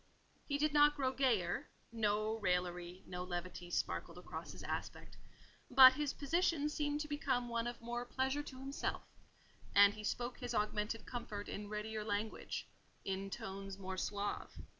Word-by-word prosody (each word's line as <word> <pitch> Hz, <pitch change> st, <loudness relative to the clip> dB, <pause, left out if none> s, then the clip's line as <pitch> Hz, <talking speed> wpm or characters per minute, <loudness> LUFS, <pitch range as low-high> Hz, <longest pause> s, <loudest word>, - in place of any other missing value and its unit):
He 285 Hz, -, +1 dB
did 300 Hz, +1 st, +2 dB
not 295 Hz, 0 st, +6 dB
grow 265 Hz, -3 st, +1 dB
gayer—no 215 Hz, -1 st, 0 dB
raillery, 180 Hz, -1 st, -1 dB
no 180 Hz, 0 st, -4 dB
levity 175 Hz, 0 st, -5 dB
sparkled -, -, -2 dB
across -, -, -7 dB
his -, -, -9 dB
aspect—but 260 Hz, 0 st, +3 dB
his 290 Hz, +1 st, 0 dB
position 300 Hz, 0 st, +1 dB
seemed 295 Hz, 0 st, -1 dB
to 300 Hz, -, -3 dB
become 270 Hz, -5 st, 0 dB
one 235 Hz, 0 st, 0 dB
of 240 Hz, 0 st, -4 dB
more 240 Hz, +1 st, -3 dB
pleasure 265 Hz, +3 st, 0 dB
to 275 Hz, -3 st, -9 dB
himself, 275 Hz, +1 st, -3 dB, 0.7 s
and 200 Hz, 0 st, +8 dB
he 210 Hz, -, -8 dB
spoke 240 Hz, +3 st, -2 dB
his 245 Hz, -2 st, -3 dB
augmented 210 Hz, +1 st, 0 dB
comfort 210 Hz, -4 st, -5 dB
in 205 Hz, 0 st, -5 dB
readier 215 Hz, 0 st, -3 dB
language, 210 Hz, +1 st, -3 dB, 0.4 s
in 195 Hz, 0 st, -2 dB
tones 195 Hz, 0 st, -6 dB
more 190 Hz, -1 st, -4 dB
suave. 205 Hz, +2 st, -2 dB
225 Hz, 145 wpm, -37 LUFS, 200-265 Hz, 0.7 s, and